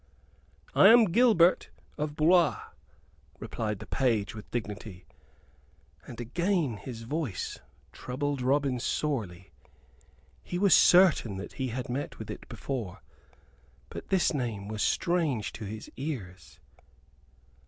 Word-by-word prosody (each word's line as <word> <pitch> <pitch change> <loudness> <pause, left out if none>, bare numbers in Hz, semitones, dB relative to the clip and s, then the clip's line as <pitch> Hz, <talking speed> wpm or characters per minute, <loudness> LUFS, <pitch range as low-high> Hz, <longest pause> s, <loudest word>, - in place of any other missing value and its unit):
"I - - +7
am 230 0 +8
Gilbert 200 -6 +4 0.3
of 150 0 -4
Blois," 165 +1 +4 0.8
replied 110 0 -4
the - - -10
page, 115 -6 0
with 105 -1 -10
dignity; 105 -5 -6 1.0
and 120 - -9
again 165 - -1
his 115 +3 -8
voice 140 - -4 0.3
troubled 140 +2 -3
Robin 135 0 +1
sorely. 110 - -3 0.9
He 175 - -5
was 195 0 +4
certain 170 - +5
that 95 - -8
he 130 - -3
had 125 +1 -4
met 130 +4 -4
with - - -7
it - - -10
before; 120 -10 -5 0.9
but - - -8
this 190 -3 +2
name 115 -8 -3
was 110 0 -4
strange 165 - 0
to 110 - -7
his 110 +1 -7
ears. 105 - -7
130 Hz, 120 wpm, -28 LUFS, 110-160 Hz, 1.0 s, am